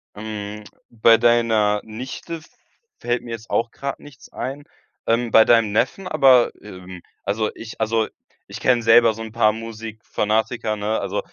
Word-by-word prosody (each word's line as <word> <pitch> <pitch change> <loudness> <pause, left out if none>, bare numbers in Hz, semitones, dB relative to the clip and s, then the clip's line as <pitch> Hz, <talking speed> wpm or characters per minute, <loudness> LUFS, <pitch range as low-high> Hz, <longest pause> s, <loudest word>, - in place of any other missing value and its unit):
Hm. 105 0 -6 0.3
Bei 115 0 +5
deiner 110 -3 +2
Nichte 130 +9 -7 0.6
fällt 120 0 -2
mir 120 - -9
jetzt 115 -1 -7
auch 115 0 0
grad 140 0 -5
nichts 145 -4 -15
ein. 140 +3 -5 0.4
Ähm, 115 0 0
bei 110 - +7
deinem 115 -3 +4
Neffen, 185 - 0
aber, 130 -6 +5
ähm 90 -3 -11 0.2
also 105 +1 -1
ich 115 0 -10
also 110 0 +1 0.4
ich - - -8
kenne 125 -2 +2
selber 115 0 +5
so 110 - -9
'n 110 -1 -7
paar 110 -1 +3
Musikfanatiker, 110 0 -3
ne? 105 +1 -1
Also - - -3
115 Hz, 155 wpm, -21 LUFS, 110-120 Hz, 0.6 s, bei